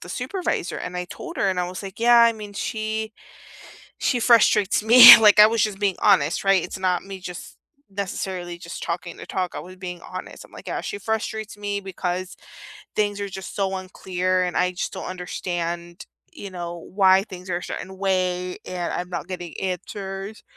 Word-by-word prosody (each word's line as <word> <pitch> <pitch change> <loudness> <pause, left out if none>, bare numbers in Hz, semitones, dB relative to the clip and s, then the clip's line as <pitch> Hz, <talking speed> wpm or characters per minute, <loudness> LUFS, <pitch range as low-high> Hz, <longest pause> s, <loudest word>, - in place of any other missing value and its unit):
the 175 - -11
supervisor, 255 - -3
and 180 0 -6
I 180 - -3
told 345 -3 -8
her 195 - +1
and 185 -1 0
I 180 - -2
was 185 +2 -7
like: 195 +3 -9
"Yeah, 240 0 +6
I 235 0 +6
mean, 210 -2 -9
she 220 +1 -3 0.9
she 250 - 0
frustrates 215 -5 +4
me" 235 +1 +12
Like 210 -1 +6
I 210 - +10
was 225 -1 0
just 205 -2 -1
being 200 -3 0
honest, 170 -7 +3
right? 195 -2 +4
It's - - -7
not 180 -2 0
me 195 -1 -8
just 180 -1 -9 0.3
necessarily 185 -3 -5
just 170 -1 -8
talking 170 0 -5
to - - -9
talk, 185 -2 -3
I - - -4
was 185 +1 -11
being 180 -2 -7
honest. 185 +1 -9
I'm - - -23
like: - - -13
"Yeah, - - -2
she 415 - -5
frustrates 220 - -4
me 205 0 -3
because 185 -1 -4 0.6
things 205 -1 0
are 200 - -3
just 190 -1 -8
so 195 -1 -1
unclear 185 0 -1
and 180 - -3
I 180 0 +2
just 180 - -4
don't 190 - -6
understand, 175 -1 -5 0.3
you 200 - -8
know, 175 -1 -6 0.2
why 190 -1 +5
things 185 -3 -10
are 175 - 0
a - - -11
certain 190 0 -7
way 185 -2 -1
and 180 -1 -3
I'm 180 0 -4
not 175 - -5
getting 175 -3 -7
answers," 195 +2 -5
190 Hz, 195 wpm, -23 LUFS, 180-205 Hz, 0.9 s, me